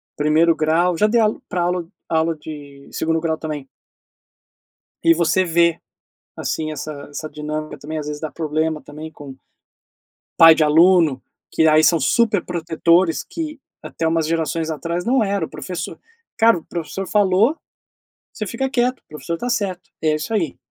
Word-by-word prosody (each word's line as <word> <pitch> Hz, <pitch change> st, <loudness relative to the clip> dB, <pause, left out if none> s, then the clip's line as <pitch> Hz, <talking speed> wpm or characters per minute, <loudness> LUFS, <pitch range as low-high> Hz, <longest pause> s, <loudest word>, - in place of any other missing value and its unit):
primeiro 155 Hz, +3 st, +3 dB
grau, 165 Hz, +3 st, +2 dB
já 210 Hz, -, +4 dB
dei 235 Hz, +2 st, +2 dB
aula 215 Hz, -1 st, +1 dB
pra 180 Hz, -, -1 dB
aula 175 Hz, -1 st, -1 dB, 0.2 s
aula 160 Hz, 0 st, +1 dB
de 145 Hz, -2 st, -11 dB
segundo 160 Hz, 0 st, 0 dB
grau 160 Hz, -1 st, -1 dB
também... 150 Hz, -4 st, -6 dB, 1.4 s
e 165 Hz, 0 st, +5 dB
você 175 Hz, +3 st, +2 dB
vê, 170 Hz, -1 st, +2 dB, 0.6 s
assim, 155 Hz, -1 st, -3 dB
essa 155 Hz, +1 st, -5 dB, 0.2 s
essa 155 Hz, +2 st, -6 dB
dinâmica, 150 Hz, 0 st, -5 dB
também, 155 Hz, +3 st, -5 dB
às 150 Hz, -, -5 dB
vezes, 150 Hz, 0 st, -5 dB
dá 155 Hz, -, -4 dB
problema, 155 Hz, -1 st, -2 dB
também, 155 Hz, +2 st, -9 dB
com 145 Hz, -3 st, -11 dB, 1.1 s
pai 165 Hz, -1 st, +10 dB
de 160 Hz, -, +1 dB
aluno, 160 Hz, -3 st, +4 dB, 0.3 s
que 160 Hz, -, +2 dB
aí 155 Hz, 0 st, +5 dB
são 165 Hz, +1 st, +4 dB
superprotetores, 170 Hz, -, +1 dB
que 310 Hz, -3 st, -6 dB, 0.2 s
até 165 Hz, -, -4 dB
umas 165 Hz, -1 st, +1 dB
gerações 165 Hz, 0 st, -1 dB
atrás 170 Hz, +4 st, -3 dB
não 250 Hz, -1 st, +2 dB
era, 200 Hz, -4 st, -1 dB
o -, -, -17 dB
professor 180 Hz, -2 st, -6 dB, 0.4 s
cara 225 Hz, -4 st, +5 dB
o -, -, -14 dB
professor 175 Hz, +3 st, -5 dB
falou, 205 Hz, -, +3 dB, 0.8 s
você 215 Hz, -, -5 dB
fica 265 Hz, +6 st, -2 dB
quieto, 250 Hz, -1 st, 0 dB
o -, -, -55 dB
professor 155 Hz, +3 st, -5 dB
tá 245 Hz, +7 st, -4 dB
certo, 195 Hz, -6 st, -2 dB
é 155 Hz, -1 st, +2 dB
isso 155 Hz, +8 st, -4 dB
aí. 170 Hz, -10 st, -1 dB
165 Hz, 160 wpm, -20 LUFS, 155-185 Hz, 1.4 s, pai